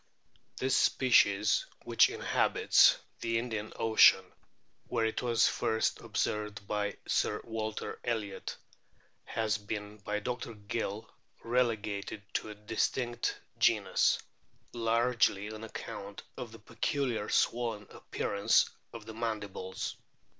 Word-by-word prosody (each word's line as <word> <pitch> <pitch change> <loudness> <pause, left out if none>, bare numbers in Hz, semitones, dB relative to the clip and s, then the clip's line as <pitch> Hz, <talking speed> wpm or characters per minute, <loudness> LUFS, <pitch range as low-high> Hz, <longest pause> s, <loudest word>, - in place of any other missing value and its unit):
This 130 +1 +1
species, 105 -5 +4 0.2
which - - +5
inhabits - - +4 0.2
the 115 0 0
Indian 110 -3 -3
Ocean, 110 -4 +6 0.6
where 115 -2 0
it 110 - -1
was 120 -2 +3
first 110 0 0
observed 105 -1 -2
by 105 -1 -1
Sir - - +1
Walter 110 -1 -4
Elliot, 110 -4 -3 0.7
has 110 -1 -1
been 105 0 -6
by 105 +1 -2
Dr. 120 +1 -4
Gill 105 +1 -4 0.4
relegated 110 -4 -1
to - - -2
a 105 - -7
distinct 120 +3 -1 0.2
genus, - - +3 0.6
largely 115 -3 +1
on 110 +1 -8
account 100 -2 -7
of 120 -3 -7
the 115 - -11
peculiar 120 0 -2
swollen 115 -3 +1
appearance 100 0 +1 0.2
of 115 -2 -9
the 110 - -8
mandibles. 105 -5 -4
110 Hz, 110 wpm, -31 LUFS, 105-115 Hz, 0.7 s, Ocean